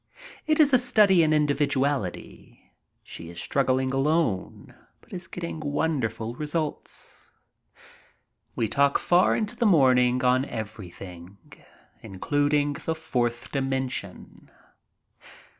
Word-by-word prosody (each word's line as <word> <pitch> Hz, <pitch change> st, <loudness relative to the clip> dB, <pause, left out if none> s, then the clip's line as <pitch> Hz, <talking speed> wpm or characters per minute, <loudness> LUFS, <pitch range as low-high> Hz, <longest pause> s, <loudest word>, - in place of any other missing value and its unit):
It 310 Hz, 0 st, +2 dB
is 290 Hz, -3 st, +5 dB
a 255 Hz, -, +7 dB
study 210 Hz, -7 st, +4 dB
in 155 Hz, -1 st, +2 dB
individuality. 145 Hz, -, -1 dB, 0.3 s
She 85 Hz, -, -9 dB
is 85 Hz, -, -8 dB
struggling 130 Hz, -1 st, 0 dB
alone, 135 Hz, -, -1 dB, 0.3 s
but -, -, -19 dB
is 185 Hz, 0 st, -6 dB
getting 170 Hz, -2 st, -6 dB
wonderful 145 Hz, -7 st, -2 dB
results. 150 Hz, +3 st, -5 dB, 1.3 s
We 115 Hz, -, 0 dB
talk 140 Hz, +5 st, +2 dB
far 175 Hz, +1 st, +3 dB
into 215 Hz, +2 st, -3 dB
the 235 Hz, -1 st, +1 dB
morn 135 Hz, -9 st, +5 dB
ing 125 Hz, +1 st, +1 dB
on 130 Hz, +1 st, +3 dB
everything, 95 Hz, -5 st, -9 dB, 0.6 s
including 145 Hz, +8 st, 0 dB
the 160 Hz, +2 st, -4 dB
fourth 120 Hz, -7 st, -2 dB
dimension. 130 Hz, -7 st, -4 dB
140 Hz, 110 wpm, -25 LUFS, 120-160 Hz, 1.3 s, a